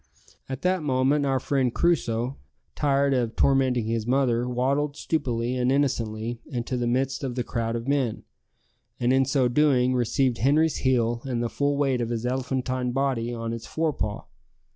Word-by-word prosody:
At 130 0 -5
that 185 -1 +1
moment 140 +1 +1
our 135 -1 +1
friend 130 -1 0
Crusoe, 125 -6 0 0.4
tired 140 -1 +2
of 120 -3 0
tormenting 130 -4 +2
his 115 0 -2
mother, 125 -2 +1
waddled 140 +4 0
stupidly 125 -6 -1
and 125 0 +1
innocently 115 -4 -1
into 125 -2 -3
the 120 -1 -1
midst 130 +3 0
of 130 -3 -3
the 125 - -1
crowd 115 -1 -2
of 115 +2 -4
men, 135 -6 0 0.8
and 125 +1 +2
in 135 0 +4
so 135 -1 +2
doing 130 -1 +3
received 125 +1 +1
Henri's 150 +5 +3
heel 120 -3 +1
and 120 -3 -2
the 120 - -1
full 140 +2 0
weight 135 -3 +1
of 115 - -2
his 120 0 -3
elephantine 130 0 -1
body 130 -3 -1
on 115 -1 -4
its 115 - -7
fore 160 -1 -1
paw. 105 -5 -3
130 Hz, 170 wpm, -25 LUFS, 120-140 Hz, 0.8 s, in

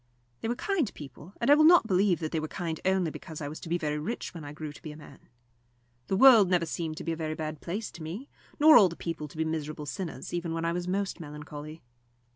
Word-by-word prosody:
They - - -3
were 240 - 0
kind 335 - 0
people, 150 +5 -11
and 240 +4 +3
I - - +11
will 305 +1 +5
not 335 -4 +7
believe 190 -3 +2
that 155 - -3
they 160 - 0
were 155 - -3
kind 165 -2 -4
only 190 -3 +2
because 160 0 -8
I 145 - -4
was 150 +2 -7
to - - -9
be 170 - +1
very 150 -3 -2
rich 185 +8 -4
when 165 -3 -8
I 145 - -7
grew 150 0 -7
to - - -14
be 155 - -7
a 150 - -11
man. 150 -2 -13 0.9
The 190 - 0
world 230 -6 +8
never 175 -2 +2
seemed 160 -1 -4
to - - -6
be 165 - -2
a - - -1
very 155 -1 -3
bad 155 -1 -5
place 205 +6 -4
to 170 - -12
me, 180 - -6 0.3
nor 310 +1 +9
all 195 -4 +7
the 170 - -8
people 165 -3 -5
to 150 - -14
be 160 - 0
miserable 155 -1 -4
sinners, 165 +4 -6
even 170 -1 -2
when 165 0 -2
I 170 - 0
was 175 0 -3
most 195 +1 -2
melancholy. 150 0 -9
165 Hz, 260 wpm, -29 LUFS, 155-190 Hz, 0.9 s, I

